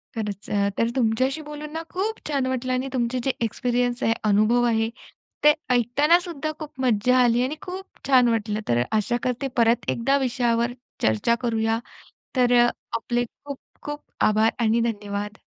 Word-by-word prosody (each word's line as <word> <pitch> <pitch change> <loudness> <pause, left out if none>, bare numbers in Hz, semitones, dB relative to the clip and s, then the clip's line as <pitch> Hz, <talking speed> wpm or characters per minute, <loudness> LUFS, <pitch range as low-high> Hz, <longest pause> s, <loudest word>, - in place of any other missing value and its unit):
खरचं 210 -3 -4
अ, - - +1
तर 230 - +2
तुमच्याशी 255 +4 +1
बोलून 300 0 -8
ना 325 - -3
खूप 420 +4 -2
छान 280 -3 0
वाटलं 255 0 -1
आणि 255 +1 -1
तुमचे 250 0 0
जे 270 - +2
एक्सपिरियन्स 245 +1 0
आहे, 225 - +3
अनुभव 215 +3 +3
आहे 225 -1 +1 0.5
ते 300 0 +8 0.2
ऐकतानासुद्धा 300 - +2
खूप 310 -2 -6
मज्जा 250 0 +3
आली 240 0 +3
आणि 270 +4 -2
खूप 375 +1 -6 0.2
छान 255 -3 +5
वाटलं. 215 -2 -1
तर 120 0 +2
आशा 220 +2 +1
करते, 255 +2 -1
परत 235 0 +3
एकदा 270 +4 +2
विषयावर 240 -2 0 0.3
चर्चा 110 - +2
करूया. 225 -2 0 0.6
तर 245 -1 +3 0.4
आपले 240 +1 -1 0.2
खूप 280 -2 -6 0.2
खूप 295 0 -5 0.3
आभार 215 +1 +3
आणि 230 0 +2
धन्यवाद. 205 0 -5
245 Hz, 155 wpm, -24 LUFS, 225-270 Hz, 0.6 s, ते